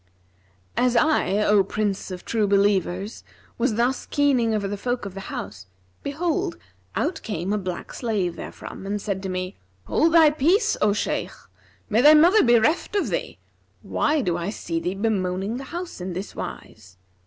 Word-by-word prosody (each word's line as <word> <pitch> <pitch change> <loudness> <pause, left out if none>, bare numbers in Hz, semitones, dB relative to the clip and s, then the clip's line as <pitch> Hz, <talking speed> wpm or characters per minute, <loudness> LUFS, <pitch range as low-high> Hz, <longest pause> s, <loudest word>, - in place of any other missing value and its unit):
As 250 -1 +2
I, 235 - +3
O 210 -2 +4
Prince 200 0 -2
of 180 -1 -7
True 220 -3 +1
Believers, 200 0 +1 0.4
was 235 -2 +1
thus 245 +3 0
keening 270 -6 +2
over 210 -2 0
the 205 - -3
folk 245 +3 -3
of 195 - -6
the 195 - -7
house,[FN#341] 95 -2 -9
behold, 340 +5 -2 0.4
out 330 -3 -1
came 195 -2 -3
a - - +1
black 185 -2 -5
slave 200 -8 -1
therefrom 190 - -8
and 205 +1 -1
said 200 -2 -3
to 190 - -4
me, 185 +1 -4 0.3
'Hold 325 +1 +2
thy 320 -2 +7
peace, 355 - +2
O 210 - +4
Shaykh! 210 - -2 0.5
May 220 +2 +3
thy 300 +3 +8
mother 350 +8 +6
be 240 -1 +5
reft 310 - +1
of 405 - +1
thee! - - -3 0.5
Why 300 -1 +1
do 180 -7 0
I 175 +2 -3
see 170 -5 -3
thee 175 +3 -3
bemoaning 195 0 -1
the 270 - -7
house 345 - -6
in 180 0 -4
this 185 +3 -6
wise?' 90 -1 -8
210 Hz, 175 wpm, -24 LUFS, 185-270 Hz, 0.5 s, thy